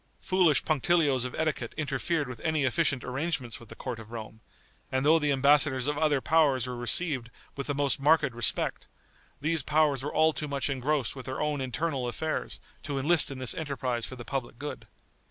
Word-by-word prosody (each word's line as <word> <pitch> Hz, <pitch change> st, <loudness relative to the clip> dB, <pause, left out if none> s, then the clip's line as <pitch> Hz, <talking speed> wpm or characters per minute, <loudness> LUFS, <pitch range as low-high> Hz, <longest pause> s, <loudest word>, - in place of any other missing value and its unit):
Foolish 175 Hz, -7 st, +3 dB
punctilios 150 Hz, -4 st, +2 dB
of 125 Hz, -, -5 dB
etiquette 155 Hz, -7 st, -2 dB
interfered 150 Hz, +1 st, -1 dB
with 125 Hz, -3 st, -8 dB
any 155 Hz, -2 st, +1 dB
efficient 135 Hz, 0 st, +1 dB
arrangements 130 Hz, -2 st, -2 dB
with 115 Hz, -, -15 dB
the -, -, -9 dB
court 125 Hz, -3 st, -5 dB
of 110 Hz, -1 st, -11 dB
Rome, 110 Hz, -1 st, -8 dB, 0.5 s
and 130 Hz, +1 st, 0 dB
though 160 Hz, +2 st, +6 dB
the 150 Hz, -2 st, +1 dB
embassadors 140 Hz, -1 st, +3 dB
of 150 Hz, +1 st, 0 dB
other 150 Hz, -2 st, +2 dB
powers 140 Hz, -5 st, +3 dB
were 125 Hz, -1 st, -4 dB
received 120 Hz, +1 st, +1 dB, 0.3 s
with 140 Hz, -, -4 dB
the 145 Hz, -, -1 dB
most 140 Hz, -1 st, +1 dB
marked 150 Hz, -2 st, +3 dB
respect, 120 Hz, 0 st, -1 dB, 0.5 s
these 160 Hz, +1 st, +1 dB
powers 150 Hz, -2 st, +2 dB
were 145 Hz, -, -3 dB
all 160 Hz, +1 st, +3 dB
too 150 Hz, -, -4 dB
much 140 Hz, 0 st, -1 dB
engrossed 135 Hz, -1 st, -1 dB
with 130 Hz, -2 st, -9 dB
their 130 Hz, -, -4 dB
own 150 Hz, -2 st, -1 dB
internal 130 Hz, +1 st, -2 dB
affairs 155 Hz, +6 st, -3 dB, 0.2 s
to 140 Hz, -2 st, -4 dB
enlist 150 Hz, +4 st, +3 dB
in 135 Hz, -, -6 dB
this 130 Hz, -3 st, 0 dB
enterprise 130 Hz, -6 st, -3 dB
for 130 Hz, -, -8 dB
the 120 Hz, -2 st, -9 dB
public 130 Hz, -4 st, -4 dB
good. 145 Hz, +2 st, -7 dB
140 Hz, 190 wpm, -28 LUFS, 130-155 Hz, 0.5 s, though